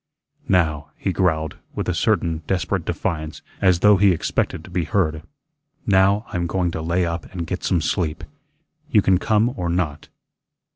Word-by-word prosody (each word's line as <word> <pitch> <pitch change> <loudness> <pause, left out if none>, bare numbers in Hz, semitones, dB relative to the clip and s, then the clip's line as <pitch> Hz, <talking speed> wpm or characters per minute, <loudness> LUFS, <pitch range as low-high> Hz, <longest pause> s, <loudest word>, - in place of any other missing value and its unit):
"Now," 80 -6 +1
he 95 - -2
growled, 80 -3 0 0.2
with - - -3
a - - +1
certain 80 -1 +1
desperate 95 -3 -1
defiance, 80 -1 -3 0.2
as 90 -3 +3
though 105 -1 +6
he 100 +1 +5
expected 85 - -2
to - - -13
be 90 -2 -1
heard, 80 -7 0 0.6
"now, 100 +1 +3
I'm 85 -1 -2
going 90 0 0
to 80 - -4
lay 85 +2 +1
up 85 0 -4
and 90 -3 -4
get 90 +3 -4
some 90 -4 +1
sleep. 80 0 -1 0.7
You 105 - +4
can 95 -2 +3
come 110 +4 +2
or 90 -6 -2
not." 80 -4 -2
90 Hz, 165 wpm, -22 LUFS, 80-95 Hz, 0.7 s, though